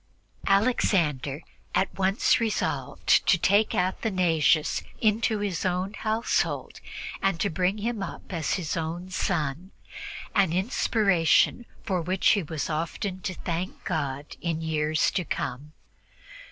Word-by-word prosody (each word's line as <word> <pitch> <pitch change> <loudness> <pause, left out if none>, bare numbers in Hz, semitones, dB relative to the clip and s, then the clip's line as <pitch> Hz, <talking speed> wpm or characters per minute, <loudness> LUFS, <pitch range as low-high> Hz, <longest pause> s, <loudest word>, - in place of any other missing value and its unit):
Alexander 170 - +2 0.3
at 195 - +1
once 195 +2 +3
resolved 225 -2 +1
to 180 - +6
take 200 +5 +3
Athanasius 180 -5 +2 0.2
into 220 0 +2
his 200 -4 -2
household 200 +5 -1 0.4
and 195 -3 +1
to 200 - 0
bring 180 +5 +1
him 220 0 -2
up 195 - -7
as 160 -4 0
his 170 -5 -2
own 170 +3 -4
son, 170 -2 -1 0.6
an 195 -6 +3
inspiration 195 0 +2 0.2
for 190 -5 0
which 180 +3 +2
he 205 - +3
was 155 -2 -3
often 170 +4 -3
to 185 - -3
thank 175 +3 -4
God 145 -5 -2 0.2
in 165 -2 -1
the - - -4
years 155 -1 +1
to 180 - -1
come. 145 -1 -4
185 Hz, 125 wpm, -27 LUFS, 160-200 Hz, 0.6 s, to